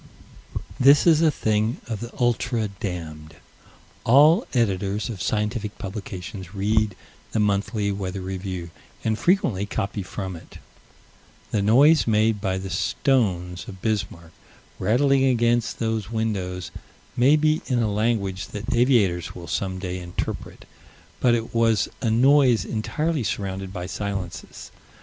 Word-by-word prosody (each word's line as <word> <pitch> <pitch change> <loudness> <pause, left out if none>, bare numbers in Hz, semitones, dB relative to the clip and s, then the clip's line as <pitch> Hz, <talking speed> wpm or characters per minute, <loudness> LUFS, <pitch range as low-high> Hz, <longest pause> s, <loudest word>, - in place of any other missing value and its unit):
This 140 +3 +6
is 165 -2 +5
a 165 - +5
thing 110 -4 0
of 110 -3 -4
the 120 0 -7
ultra 120 -2 0
damned. 80 -5 -6 0.7
All 150 - +5
Editors 105 -2 0
of 105 -6 -6
scientific 105 +1 -2
publications 95 -2 -7
read 105 0 +1 0.4
the 110 - +1
Monthly 105 0 0
Weather 95 -1 -4
Review 95 -2 -5 0.3
and 110 -1 +1
frequently 115 - +1
copy 100 0 -3
from 95 0 -5
it. 80 - -12 0.9
The 105 - +1
noise 140 +10 +5
made 110 -1 +2
by 95 -2 -1
the 95 0 -5
stones 90 - 0
of 95 - -9
Bismarck, 95 -7 -2 0.5
rattling 135 +4 +3
against 120 -2 +2
those 110 -3 -2
windows, 95 -6 -3 0.4
may 135 +5 +5
be 155 0 +2
in 125 - +1
a 110 -3 +1
language 100 -4 -1
that 105 +3 -4
aviators 115 -9 +2
will 85 - -8
some 95 -2 -2
day 90 -1 -4
interpret: 90 0 -6 0.5
but 120 -1 +4
it 115 -1 -4
was 115 -2 +2
a 115 - +1
noise 130 +1 +4
entirely 150 +6 -1
surrounded 95 -2 -3
by 90 -2 -5
silences. 100 -1 -5
105 Hz, 130 wpm, -24 LUFS, 95-120 Hz, 0.9 s, This